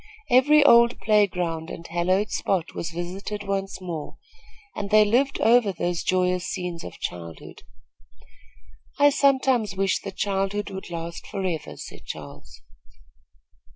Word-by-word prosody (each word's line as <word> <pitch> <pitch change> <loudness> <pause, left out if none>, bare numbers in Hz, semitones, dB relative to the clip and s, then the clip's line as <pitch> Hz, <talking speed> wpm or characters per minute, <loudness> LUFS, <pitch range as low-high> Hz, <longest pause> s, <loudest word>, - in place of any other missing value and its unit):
Every 290 +4 +6
old 235 -3 +6
playground 180 -6 +1
and 165 - -8
hallowed 185 +5 0
spot 180 -4 -1
was 170 - -4
visited 190 +4 -5
once 195 -1 -2
more, 170 -5 -6 0.6
and 200 - -4
they 215 0 +6
lived 255 +6 +1
over 230 -3 +4
those 175 -1 -2
joyous 180 -1 +1
scenes 175 -2 -4
of 90 - -9
childhood. 85 -3 -7 1.4
"I 290 0 +6
sometimes 260 -7 +2
wish 195 0 0
that 195 -1 -8
childhood 200 +1 -1
would 190 -1 -7
last 170 0 -6
forever," 185 -6 -4
said - - -10
Charles. - - -9
195 Hz, 125 wpm, -24 LUFS, 175-215 Hz, 1.4 s, Every